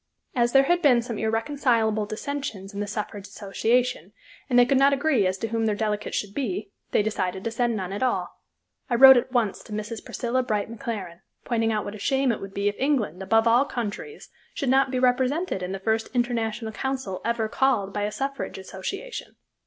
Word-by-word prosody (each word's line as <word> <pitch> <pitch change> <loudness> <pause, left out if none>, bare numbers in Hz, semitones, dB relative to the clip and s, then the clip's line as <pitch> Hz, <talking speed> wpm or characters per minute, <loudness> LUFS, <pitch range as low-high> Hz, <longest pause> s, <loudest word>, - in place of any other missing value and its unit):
As 240 -1 +2
there 270 0 +7
had 350 +5 +2
been 250 -7 +5
some 230 -3 -5
irreconcilable 225 -2 +1
dissensions 220 -4 -5
in 200 - -5
the 205 - -2
suffrage 205 -1 -5
association, 215 0 -1 0.4
and 245 - +3
they 245 - +7
could 265 +2 +3
not 275 +1 +5
agree 275 -8 +2
as 185 +1 -1
to 225 +3 -3
whom 225 0 0
their 210 - +1
delegate 210 -1 -2
should 205 -1 -3
be, 210 -5 -3 0.2
they - - +2
decided 190 -3 -2
to 230 - -2
send 235 0 0
none 190 -2 -4
at 200 - -4
all. 255 - -1 0.5
I 240 - +2
wrote 265 +2 +10
at 245 +1 +1
once 235 -6 0
to - - -15
Mrs. 215 +1 -5
Priscilla 245 +2 -1
Bright 215 -3 -2
McLaren, 205 -9 -5 0.3
pointing 225 -2 +1
out 215 -1 -1
what 205 - -5
a 215 - -9
shame 270 +3 +2
it 220 - -4
would 195 0 -8
be 200 0 0
if 205 - -2
England, 245 - 0
above 225 +4 +3
all 240 +3 +5
countries, 240 - -5 0.3
should 275 - -1
not 270 +1 +4
be 255 - -2
represented 255 - +1
in 180 0 -4
the 195 - -3
first 220 +3 0
International 230 -2 -1
Council 260 -6 -3
ever 230 -1 0
called 215 -5 +1
by 205 - -2
a 205 +1 -1
suffrage 275 0 -4
association. 195 - -6
225 Hz, 205 wpm, -25 LUFS, 205-255 Hz, 0.5 s, wrote